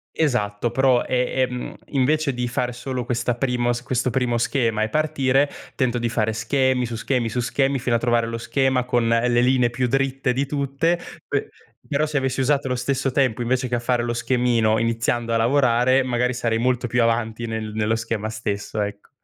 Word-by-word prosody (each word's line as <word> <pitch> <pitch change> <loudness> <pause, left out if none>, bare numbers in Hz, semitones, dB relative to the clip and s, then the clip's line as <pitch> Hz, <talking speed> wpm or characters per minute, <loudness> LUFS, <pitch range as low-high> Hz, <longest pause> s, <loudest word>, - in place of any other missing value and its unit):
Esatto, 120 -6 0
però 130 -1 +3
è 125 -1 +1 0.2
è - - +1
mhmm, 125 0 -6
invece 145 +2 +1
di 125 0 -2
fare 125 0 -1
solo 125 0 -4
questa 120 -1 -1
primo 120 -1 0
questo 125 0 0
primo 120 -1 0
schema 115 -4 0
e 110 - -1
partire, 140 -1 +1 0.3
tento 125 -2 0
di 120 0 -1
fare 110 -1 0
schemi 130 +3 +1
su 115 -1 -5
schemi 120 0 -1
su 125 - -2
schemi 135 +3 +1
fino 120 -1 0
a - - +2
trovare 120 -1 +1
lo 115 0 -4
schema 130 +1 +1
con 120 -2 +1
le 120 +1 +3
linee 125 -1 +3
più 125 +1 -1
dritte 135 0 0
di 135 +3 0
tutte, 145 +4 0 0.3
pe - - -2 0.4
però 145 +1 +1
se 150 -2 -2
avessi 130 0 0
usato 135 0 +1
lo 125 - 0
stesso 130 +1 -1
tempo 125 -3 +1
invece 125 +1 0
che 120 - 0
a 120 - 0
fare 120 0 0
lo 120 0 -1
schemino, 120 -2 +1
iniziando 115 0 0
a 115 - +3
lavorare, 125 +1 +3
magari 125 0 0
sarei 115 -2 0
molto 125 0 0
più 120 +1 +1
avanti 115 0 0
nel 110 -1 -4
nello 110 +1 0
schema 110 -1 -3
stesso, 105 -1 -3
ecco. 100 0 -5
125 Hz, 195 wpm, -22 LUFS, 115-130 Hz, 0.4 s, però